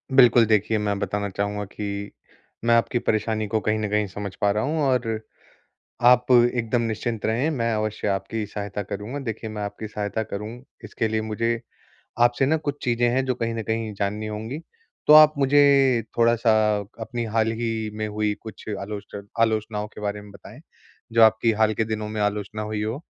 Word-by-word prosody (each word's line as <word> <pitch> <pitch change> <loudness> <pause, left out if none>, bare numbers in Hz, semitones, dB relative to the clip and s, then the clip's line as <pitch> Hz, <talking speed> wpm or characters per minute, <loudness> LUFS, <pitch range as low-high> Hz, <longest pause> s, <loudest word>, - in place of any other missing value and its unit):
बिल्कुल, 120 -3 +7
देखिए 110 +1 +2
मैं 100 -1 -1
बताना 100 +1 -2
चाहूँगा 100 +1 -2
कि 100 0 -5 0.5
मैं 115 - +5
आपकी 120 +1 +1
परेशानी 110 -1 -1
को 110 +1 0
कहीं 110 +1 0
न 105 -1 -2
कहीं 105 0 +1
समझ 100 0 -6
पा 100 0 +3
रहा 105 +1 0
हूँ 155 +4 -1
और 125 -5 +1 0.9
आप 125 0 +4
एकदम 120 -1 +3
निश्चिंत 115 0 -2
रहें, 120 +8 +1
मैं 115 -6 -1
अवश्य 110 -1 -2
आपकी 105 +3 -2
सहायता 105 0 -5
करूँगा। 105 +6 -5
देखिए 110 -1 -5
मैं 105 -1 -5
आपकी 105 +1 -5
सहायता 105 +1 -3
करूँ 105 0 -5 0.4
इसके 110 - -2
लिए 110 0 0
मुझे 115 +2 -1 0.6
आपसे 120 +2 +3
ना 160 +3 +2
कुछ 145 -2 -4
चीज़ें 120 0 +2
हैं 130 +2 +1
जो 130 -1 0
कहीं 115 -1 -2
न 115 - -3
कहीं 110 0 -2
जाननी 105 +2 -2
होंगी। 110 +7 -5 0.5
तो 150 - +8
आप 155 0 +9
मुझे 140 -3 +4
थोड़ा-सा 115 0 +3 0.5
अपनी 115 +1 -4
हाल 115 0 +2
ही 115 -1 -2
में 110 0 -2
हुई 105 0 -1
कुछ 110 - -10
आलोच 100 +1 -7 0.2
आलोचनाओं 110 -1 0
के 105 - -12
बारे 105 0 -3
में 105 -1 -13
बताएँ - - -13 0.5
जो 115 - +4
आपकी 110 +1 +4
हाल 110 0 +2
के 110 - 0
दिनों 110 -1 -3
में 110 -1 -3
आलोचना 105 0 -2
हुई 105 0 -3
हो। 115 +8 -3
110 Hz, 185 wpm, -24 LUFS, 105-120 Hz, 0.9 s, आप